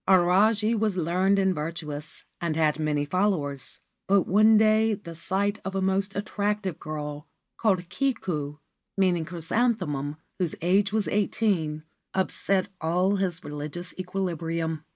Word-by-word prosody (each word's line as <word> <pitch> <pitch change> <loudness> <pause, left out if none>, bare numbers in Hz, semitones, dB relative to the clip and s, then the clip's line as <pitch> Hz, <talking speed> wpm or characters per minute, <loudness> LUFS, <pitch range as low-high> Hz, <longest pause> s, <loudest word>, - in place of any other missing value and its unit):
Ajari 200 +4 +4
was 215 -3 0
learned 185 +4 +2
and 190 -1 +3
virtuous, 150 -1 -5 0.2
and 170 -3 -1
had 155 -1 +2
many 150 -2 0
followers; 145 -6 -1 0.3
but 195 -1 +4
one 215 +3 +5
day 215 0 +4
the 175 -4 -10
sight 200 +5 -1
of 195 0 -4
a 195 - 0
most 195 +1 0
attractive 205 -3 -2
girl 150 0 -5 0.3
called 185 -6 +1
Kiku,1 170 - -1 0.2
whose 175 -4 0
age 195 +4 +2
was 215 -1 0
eighteen, 190 -7 0 0.3
upset 190 +1 +1
all 180 +5 +2
his 185 -3 -1
religious 150 +4 -6
equilibrium. 165 -4 -2
185 Hz, 120 wpm, -26 LUFS, 155-200 Hz, 0.3 s, one